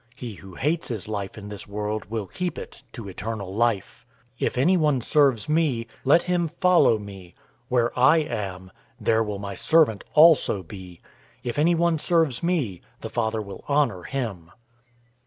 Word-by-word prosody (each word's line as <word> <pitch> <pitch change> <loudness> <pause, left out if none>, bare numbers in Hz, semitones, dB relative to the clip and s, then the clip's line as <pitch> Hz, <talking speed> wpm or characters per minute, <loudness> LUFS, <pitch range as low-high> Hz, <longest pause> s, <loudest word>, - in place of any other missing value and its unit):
He 125 -3 -7
who 95 -2 -13
hates 155 +4 -1
his 110 -7 -5
life 100 -2 -4
in 105 -1 -8
this 105 -1 -7
world 105 +1 -3
will 110 -2 -3
keep 180 - -4
it - - -9
to 115 -6 -8
eternal 100 0 -5
life. 115 -2 -1 0.4
012:026 - - +1
If - - -4
anyone 150 -1 +3
serves 135 -2 +2
me, 150 -7 +1 0.2
let 145 +5 +5
him 175 -2 0
follow 175 - +3
me. 95 -4 -11 0.3
Where 120 -1 +2
I 130 +6 +5
am, 95 - -4 0.3
there 110 0 +2
will 105 -2 -4
my 100 0 -6
servant 140 - +3
also 155 - +5
be. 90 -1 -11 0.4
If 120 +3 -3
anyone 170 0 +2
serves 160 -7 +1
me, 150 - -1 0.2
the - - -6
Father 110 -2 -1
will 100 -2 -9
honor 140 -10 +1
him. 105 -10 -5
115 Hz, 160 wpm, -24 LUFS, 100-150 Hz, 0.4 s, let